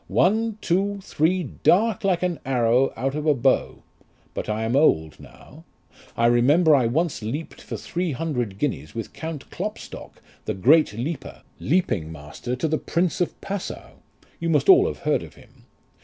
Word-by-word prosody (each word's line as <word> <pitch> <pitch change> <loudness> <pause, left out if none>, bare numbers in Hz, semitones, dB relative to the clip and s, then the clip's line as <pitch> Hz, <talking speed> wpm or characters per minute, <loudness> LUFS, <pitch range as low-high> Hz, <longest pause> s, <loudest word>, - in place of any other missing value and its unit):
One, 220 +3 +2
two, 200 +3 0
three, 175 +4 +1
dart 220 +6 +2
like 185 -3 +1
an 180 -2 -1
arrow 125 0 +2
out 135 +3 -2
of 150 +1 -3
a 150 - +4
bow. 130 +1 +1 0.5
But - - -5
I 110 +1 -1
am 115 +3 0
old 80 - +2
now. - - -15 0.5
I 115 - +2
remember 140 +8 +5
I 130 -5 +4
once 160 +5 -1
leaped 135 +10 -5
for - - -6
three 175 -1 -3
hundred 125 -9 -3
guineas 100 - -3
with 115 - -5
Count 160 -3 -6
Klopstock, 210 +4 -7 0.3
the - - -2
great 140 - +4
leaper, 135 +6 -5 0.2
leaping 120 - 0
master 80 +11 -6
to 130 +6 -1
the 155 0 0
Prince 170 0 -1
of 175 - -2
Passau; 195 -1 -6 0.4
you 165 - -2
must 160 - +2
all 385 +2 +8
have - - -6
heard - - +2
of - - -11
him. - - -20
150 Hz, 170 wpm, -24 LUFS, 120-175 Hz, 0.5 s, all